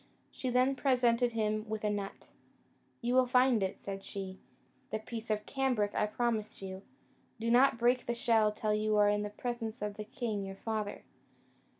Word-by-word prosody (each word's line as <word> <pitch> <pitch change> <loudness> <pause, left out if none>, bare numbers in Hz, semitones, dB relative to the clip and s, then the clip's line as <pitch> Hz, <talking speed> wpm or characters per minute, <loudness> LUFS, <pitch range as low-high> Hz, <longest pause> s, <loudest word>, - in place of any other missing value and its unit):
She 255 - -3
then 255 +2 +3
presented 245 -2 +2
him 215 -1 -1
with 220 0 -3
a 210 - +2
nut: 200 -1 -5 0.7
"You 240 +1 +1
will 255 0 +5
find 250 -2 +4
in 190 - +2
it," - - -16
said 195 -1 -5
she, 190 -1 -6 0.5
"the - - -1
piece 225 +1 -7
of 210 -1 0
cambric 250 -7 0
I 210 - +1
promised 220 -1 -1
you: 190 -1 -6 0.6
do 230 +1 0
not 250 0 +5
break 240 +2 +2
the 240 - 0
shell 230 -4 +3
till 210 0 -1
you 215 0 +1
are 205 0 +5
in 205 0 +1
the 210 - -3
presence 235 +1 -4
of 210 0 -4
the 215 - -4
king 215 -3 -3
your 195 0 -6
father." 215 0 -3
220 Hz, 190 wpm, -32 LUFS, 210-245 Hz, 0.7 s, will